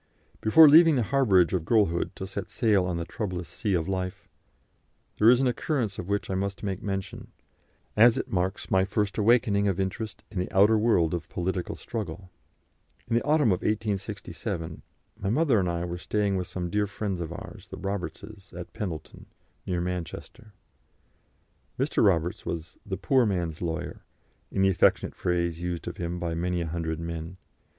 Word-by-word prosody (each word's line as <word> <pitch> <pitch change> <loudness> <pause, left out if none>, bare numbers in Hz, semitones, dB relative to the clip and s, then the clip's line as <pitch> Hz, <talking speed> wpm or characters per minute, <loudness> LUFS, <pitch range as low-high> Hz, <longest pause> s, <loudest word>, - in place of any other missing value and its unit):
Before 155 +9 +8
leaving 160 +1 +8
the 125 - +2
harbourage 100 -9 +3
of 90 -4 0
girlhood 95 -2 +1
to 95 - -5
set 95 0 -6
sail 105 -6 +2
on 90 -2 -2
the 85 - -3
troublous 90 -5 -4
sea 95 +5 -2
of 80 -2 -1
life, 95 +1 -3 0.9
there 110 - +7
is 125 0 +6
an 135 - +2
occurrence 120 -4 -1
of 90 - -6
which 100 0 -1
I - - -3
must 100 +1 -3
make 95 0 -3
mention, 95 -3 -4 0.7
as 115 +2 +6
it - - -2
marks 95 +1 -2
my 95 0 +4
first 100 +2 -1
awakening 105 -2 +3
of 95 -1 0
interest 95 +3 -3
in 100 - -3
the 90 - -3
outer 105 +3 +5
world 105 -8 +3
of 85 -2 -4
political 90 0 -2
struggle. 95 -4 -6 0.8
In 115 - 0
the 120 - +3
autumn 150 -3 +3
of 90 -3 +2
1867 100 -5 -3 0.4
my 95 - -2
mother 130 -1 +3
and 90 -2 0
I 85 0 -2
were 90 0 -5
staying 100 +1 0
with 90 -2 -2
some 90 -2 -4
dear 105 0 +1
friends 100 -2 -3
of 85 -1 -4
ours, 85 - -9
the - - -8
Robertses, 100 +1 -6
at 90 0 -8
Pendleton, 95 -9 -6 0.4
near 90 -1 0
Manchester. 90 +4 -6 1.2
Mr. - - +1
Roberts 85 -3 +2
was 85 -1 -5
"the 95 -2 -4
poor 125 +5 +3
man's 85 -5 -2
lawyer," 85 0 -4 0.5
in 95 - +1
the 95 - +5
affectionate 95 - +3
phrase 85 -1 -1
used 90 -1 -4
of 85 - -5
him 85 0 -3
by 85 -1 -3
many 90 +2 -1
a - - -2
hundred 80 -1 -3
men. 85 +1 -5
95 Hz, 175 wpm, -27 LUFS, 85-105 Hz, 1.2 s, Before